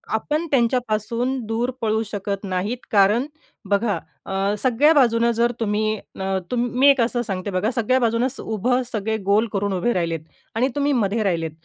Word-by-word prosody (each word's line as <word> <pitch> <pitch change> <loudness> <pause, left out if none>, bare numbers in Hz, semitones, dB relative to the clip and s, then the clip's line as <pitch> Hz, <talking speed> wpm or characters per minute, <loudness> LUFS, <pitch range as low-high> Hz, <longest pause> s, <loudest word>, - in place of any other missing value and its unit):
आपण 300 +8 -1
त्यांच्यापासून 240 0 0
दूर 225 +3 -1
पळू 220 0 +1
शकत 200 0 -3
नाहीत. 195 +5 -2
कारण 210 +5 +4 0.4
बघा 205 +1 +1 0.3
अ, 195 +1 0
सगळ्या 260 +5 +4
बाजूनं 235 -4 +3
जर 235 +1 +1
तुम्ही 215 0 0 0.2
न, 190 0 -1 0.2
मी 245 +3 +2
एक 275 -3 +4
असं 240 +1 0
सांगते 195 -3 -4
बघा 190 +5 0
सगळ्या 255 +1 +1
बाजूनं 235 +1 +1 0.2
उभं 245 +4 0
सगळे 220 0 -1
गोल 205 +4 +3
करून 200 0 0
उभे 190 +6 0
राहिलेत 165 -2 -1 0.4
आणि 250 +4 +2
तुम्ही 285 0 +1
मधे 220 -2 +1
राहिलेत. 165 -5 -1
225 Hz, 160 wpm, -22 LUFS, 200-245 Hz, 0.4 s, कारण